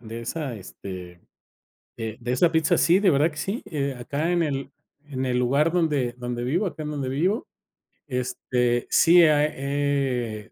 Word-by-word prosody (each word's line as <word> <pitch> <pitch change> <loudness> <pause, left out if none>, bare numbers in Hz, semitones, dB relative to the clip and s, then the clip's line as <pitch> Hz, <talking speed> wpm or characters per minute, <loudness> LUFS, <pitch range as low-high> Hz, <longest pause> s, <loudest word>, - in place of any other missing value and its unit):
de 115 0 -7
esa, 135 +1 -4
este, 90 -2 -9 0.8
de 110 -1 -5
de 125 +1 -2
esa 165 +6 +3
pizza. 160 +2 +3
Sí, 170 +3 +4
de 200 -1 +3
verdad 150 0 +4
que 150 - -11
sí, 195 +8 -3
eh, 140 -4 -3
acá 145 +7 -2
en 175 -1 +2
el 140 -3 -2 0.4
en 130 -3 -3
el 125 -1 0
lugar 140 +6 +2
donde 150 -8 +1
donde 120 -1 -4
vivo, 170 +11 0
acá 160 -3 -5
en 150 - -4
donde 140 -3 -3
vivo, 180 - 0 0.6
este, 125 -2 -1
sí, 175 +1 +6
ah, 150 -2 +4
eh, 140 -6 -1
140 Hz, 170 wpm, -25 LUFS, 125-160 Hz, 0.8 s, sí